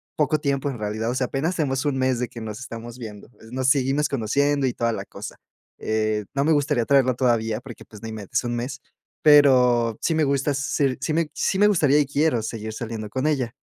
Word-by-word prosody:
poco 155 Hz, 0 st, +1 dB
tiempo 140 Hz, -1 st, -1 dB
en 130 Hz, -, -5 dB
realidad, 110 Hz, +2 st, -2 dB
o 125 Hz, -, -2 dB
sea, 130 Hz, -1 st, 0 dB
apenas 155 Hz, +8 st, -1 dB
tenemos 135 Hz, -5 st, 0 dB
1 145 Hz, -3 st, 0 dB
mes 130 Hz, -1 st, +1 dB
de 125 Hz, -, -2 dB
que 120 Hz, -, -9 dB
nos 110 Hz, 0 st, -6 dB
estamos 120 Hz, -1 st, -8 dB
viendo. 105 Hz, -4 st, -9 dB, 0.2 s
Nos 130 Hz, 0 st, -1 dB
seguimos 140 Hz, +1 st, +2 dB
conociendo 140 Hz, +3 st, +1 dB
y 120 Hz, -, -1 dB
toda 115 Hz, -1 st, -1 dB
la -, -, -4 dB
cosa, -, -, -9 dB, 0.4 s
eh, 110 Hz, -1 st, -1 dB
no 140 Hz, 0 st, 0 dB
me 160 Hz, -, +4 dB
gustaría 145 Hz, -5 st, +1 dB
traerla 135 Hz, -2 st, +4 dB
todavía 115 Hz, -3 st, 0 dB
porque, 125 Hz, -2 st, -11 dB
pues, 105 Hz, -2 st, -14 dB
no 115 Hz, -, -6 dB
inventes, 110 Hz, -3 st, -3 dB
1 120 Hz, 0 st, -2 dB
mes, 125 Hz, +3 st, -4 dB, 0.4 s
pero 125 Hz, -6 st, +5 dB
sí 165 Hz, -, +1 dB
me 155 Hz, -, +2 dB
gusta 140 Hz, +1 st, +1 dB
ser 140 Hz, -1 st, 0 dB
sí 155 Hz, -, -1 dB
me 160 Hz, -1 st, 0 dB
sí 190 Hz, -, 0 dB
me 210 Hz, -, +6 dB
gustaría 150 Hz, -7 st, +4 dB
y 145 Hz, -, +3 dB
quiero 145 Hz, -3 st, +1 dB
seguir 110 Hz, 0 st, -5 dB
saliendo 110 Hz, -2 st, -5 dB
con 130 Hz, +6 st, -1 dB
ella. 130 Hz, -6 st, -1 dB
130 Hz, 220 wpm, -23 LUFS, 115-145 Hz, 0.4 s, me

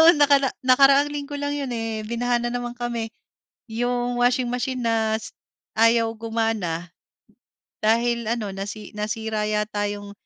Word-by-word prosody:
oo, 325 Hz, +1 st, +10 dB
nakara 285 Hz, -2 st, +5 dB, 0.2 s
nakaraang 275 Hz, +2 st, +6 dB
linggo 290 Hz, 0 st, -5 dB
lang 285 Hz, 0 st, -2 dB
'yon, 275 Hz, -3 st, -3 dB
eh, 225 Hz, -2 st, -3 dB
binaha 240 Hz, +1 st, +1 dB
na 240 Hz, -, -1 dB
naman 245 Hz, 0 st, -3 dB
kami. 240 Hz, -2 st, -3 dB, 0.6 s
Yung 245 Hz, +1 st, -1 dB
washing 245 Hz, +1 st, +3 dB
machine 250 Hz, +1 st, -2 dB
na 220 Hz, -1 st, +1 dB
s -, -, -9 dB, 0.5 s
ayaw 230 Hz, +1 st, +4 dB
gumana 220 Hz, -7 st, -2 dB, 0.9 s
dahil 235 Hz, +1 st, +2 dB
ano, 225 Hz, -4 st, -1 dB
nasi 200 Hz, +2 st, -6 dB
nasira 215 Hz, 0 st, -2 dB
yata 210 Hz, -1 st, -1 dB
yung 205 Hz, 0 st, -7 dB
230 Hz, 140 wpm, -24 LUFS, 220-245 Hz, 0.9 s, oo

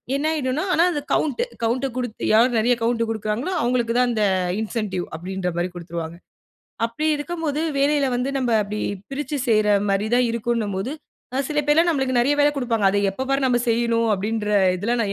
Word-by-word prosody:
என்னாயிடுன்னா 295 Hz, -2 st, 0 dB
ஆனா 335 Hz, -, +4 dB
அந்த 295 Hz, -4 st, -2 dB
count 310 Hz, -, 0 dB, 0.2 s
count 245 Hz, +4 st, 0 dB
குடுத்து 245 Hz, -3 st, -4 dB
யார் 235 Hz, +2 st, +4 dB
நிறைய 245 Hz, +3 st, +3 dB
கவுண்ட் 230 Hz, 0 st, +1 dB
குடுக்குறாங்களோ! 220 Hz, -, -2 dB
அவுங்களுக்கு 240 Hz, -1 st, +1 dB
தான் 250 Hz, 0 st, +4 dB
அந்த 215 Hz, -2 st, 0 dB, 0.4 s
இன்சென்டிவ் 210 Hz, -5 st, -3 dB
அப்பிடின்றமாரி 180 Hz, 0 st, -3 dB
கொடுத்துருவாங்க. 170 Hz, -1 st, -6 dB, 0.7 s
அப்பிடி 305 Hz, +7 st, -2 dB
இருக்கும்போது 310 Hz, -1 st, -3 dB, 0.2 s
வேலையில 285 Hz, 0 st, +2 dB
வந்து 250 Hz, +3 st, -1 dB
நம்ம 250 Hz, -2 st, 0 dB
அப்பிடி 210 Hz, +1 st, -5 dB, 0.3 s
பிரிச்சு 290 Hz, +2 st, -3 dB
செய்றமாரி 205 Hz, -2 st, +2 dB
தான் 250 Hz, 0 st, +3 dB
இருக்குன்னம்போது, 230 Hz, 0 st, -2 dB, 0.4 s
அ -, -, 0 dB
சில 300 Hz, -1 st, +1 dB
பேர்லாம் 325 Hz, +4 st, +4 dB
நம்மளுக்கு 265 Hz, -4 st, 0 dB
நிறைய 280 Hz, +4 st, +2 dB
வேலை 290 Hz, -, +5 dB
கொடுப்பாங்க. 230 Hz, -6 st, +1 dB
அத 200 Hz, -, -1 dB, 0.2 s
எப்போ 260 Hz, +6 st, -4 dB
பாரு 275 Hz, 0 st, +1 dB
நம்ம 245 Hz, -1 st, +2 dB
செய்யணும் 230 Hz, 0 st, +1 dB
அப்பிடின்ற 210 Hz, +2 st, -2 dB, 0.3 s
இதெல்லாம் 230 Hz, +5 st, 0 dB
235 Hz, 160 wpm, -22 LUFS, 210-275 Hz, 0.7 s, வேலை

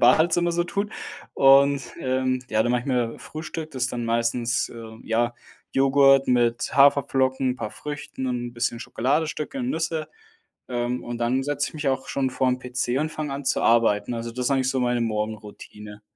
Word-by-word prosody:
Badezimmer 175 Hz, +2 st, +4 dB
so 170 Hz, 0 st, 0 dB
tut, 200 Hz, +3 st, -2 dB, 0.4 s
und, 140 Hz, 0 st, +5 dB, 0.2 s
ähm, 130 Hz, 0 st, 0 dB
ja, 110 Hz, -, +2 dB
dann 120 Hz, -, 0 dB
mache 125 Hz, -, +2 dB
ich 125 Hz, -, -11 dB
mir 125 Hz, -3 st, -1 dB
Frühstück. 155 Hz, 0 st, -7 dB
Das 130 Hz, -2 st, -4 dB
ist 135 Hz, -, -2 dB
dann 120 Hz, -1 st, -3 dB
meistens, 115 Hz, +1 st, 0 dB
äh, 115 Hz, -1 st, -10 dB
ja, 120 Hz, +1 st, 0 dB, 0.4 s
Joghurt 135 Hz, 0 st, +5 dB
mit 120 Hz, -2 st, +1 dB
Haferflocken, 135 Hz, -2 st, +3 dB
'n 125 Hz, -, -3 dB
paar 105 Hz, -, -5 dB
Früchten 145 Hz, -3 st, -6 dB
und 125 Hz, -1 st, -1 dB
'n -, -, -12 dB
bisschen 120 Hz, 0 st, -2 dB
Schokoladestücke 150 Hz, -, -1 dB
und 250 Hz, 0 st, -2 dB
Nüsse, 160 Hz, -1 st, -2 dB, 0.6 s
ähm, 120 Hz, 0 st, -2 dB
und 120 Hz, 0 st, -5 dB
dann 125 Hz, +3 st, 0 dB
setze 145 Hz, 0 st, -1 dB
ich -, -, -20 dB
mich 150 Hz, -2 st, -3 dB
auch 130 Hz, 0 st, -2 dB
schon 135 Hz, -1 st, -1 dB
vorm 125 Hz, 0 st, 0 dB
PC 125 Hz, 0 st, -2 dB
und 155 Hz, +1 st, -1 dB
fange 150 Hz, -3 st, -4 dB
an, 140 Hz, +1 st, -5 dB
zu -, -, +1 dB
arbeiten. 115 Hz, -1 st, +3 dB
Also 115 Hz, 0 st, -4 dB
das 125 Hz, +1 st, -4 dB
ist 140 Hz, -, +1 dB
eigentlich 130 Hz, -1 st, +2 dB
so 130 Hz, -1 st, 0 dB
meine 120 Hz, -1 st, +1 dB
Morgenroutine. 105 Hz, -1 st, -5 dB
130 Hz, 190 wpm, -24 LUFS, 120-140 Hz, 0.6 s, und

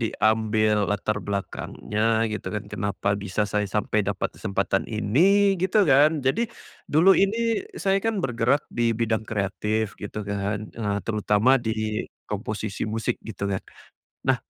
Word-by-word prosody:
diambil 110 Hz, -1 st, +2 dB, 0.2 s
latar 105 Hz, +1 st, -1 dB
belakangnya 100 Hz, +1 st, -4 dB, 0.3 s
gitu 110 Hz, -, -5 dB
kan 105 Hz, -, -3 dB
kenapa 100 Hz, -1 st, -2 dB
bisa 100 Hz, +1 st, -3 dB
saya 105 Hz, -, +2 dB
sampai 105 Hz, 0 st, +1 dB
dapat 100 Hz, -, -1 dB
kesempatan 95 Hz, -2 st, -1 dB
ini 110 Hz, +5 st, +1 dB, 0.4 s
gitu 190 Hz, +3 st, +2 dB
kan, 145 Hz, +3 st, +6 dB, 0.2 s
jadi 135 Hz, +12 st, +2 dB, 0.5 s
dulu 165 Hz, +6 st, +6 dB
ini 200 Hz, +3 st, +2 dB, 0.5 s
saya 195 Hz, 0 st, +3 dB
kan 225 Hz, 0 st, +1 dB
bergerak 120 Hz, +3 st, +1 dB
di 120 Hz, -, +1 dB, 0.2 s
bidang 115 Hz, -1 st, 0 dB
kreatif 105 Hz, +1 st, -1 dB, 0.2 s
gitu 105 Hz, +1 st, -5 dB
kan, 100 Hz, +1 st, -1 dB, 0.2 s
eee, 105 Hz, -3 st, -1 dB
terutama 105 Hz, +1 st, +2 dB, 0.2 s
di -, -, +2 dB, 0.6 s
komposisi 105 Hz, 0 st, -4 dB
musik 115 Hz, -, 0 dB
gitu 105 Hz, -, -8 dB
kan. 95 Hz, -, -2 dB, 0.7 s
Nah, -, -, +4 dB
110 Hz, 135 wpm, -25 LUFS, 105-115 Hz, 0.7 s, kan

